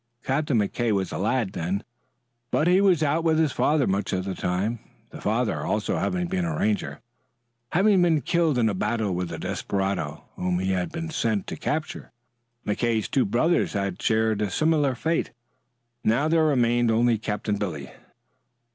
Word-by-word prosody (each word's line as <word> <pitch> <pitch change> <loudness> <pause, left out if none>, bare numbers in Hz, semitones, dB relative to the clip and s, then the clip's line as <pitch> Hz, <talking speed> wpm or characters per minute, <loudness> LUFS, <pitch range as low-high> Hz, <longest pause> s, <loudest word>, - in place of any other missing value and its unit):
Captain 140 -1 0
McKay 110 +3 0
was 95 -2 0
a - - -4
lad 110 0 0
then, 95 +6 -2 0.7
but 150 - +1
he 180 +2 +5
was 180 -6 +4
out 155 +3 +1
with 160 -1 +3
his 160 -3 +2
father 150 0 +2
much 100 +2 -1
of 95 0 -1
the 95 - -3
time, 95 +7 -1 0.3
the - - -10
father 110 +1 0
also 105 0 -1
having 180 -1 -1
been 180 0 -1
a 165 -2 -2
Ranger, 200 -2 -1 0.7
having 195 +1 +4
been 165 -4 +3
killed 165 -4 +1
in 115 -2 +3
a 105 - +1
battle 105 +1 -1
with 90 -1 -3
a 80 - -5
desperado 95 -3 -2
whom 90 -1 0
he 95 +1 -1
had 90 -1 -1
been 165 0 -5
sent 110 -8 0
to - - -5
capture. 155 0 -4 0.5
Captain 110 +3 0
McKay's 110 - -2
two 135 - +2
brothers 145 - +1
had 100 -3 -2
shared 110 -1 +1
a 105 - 0
similar 150 - +2
fate. 165 +6 -1 0.7
Now 125 +8 +2
there 160 0 +3
remained 120 -4 +2
only 115 0 +3
Captain 105 -1 -2
Billy. 90 -9 -4
120 Hz, 175 wpm, -25 LUFS, 100-155 Hz, 0.7 s, he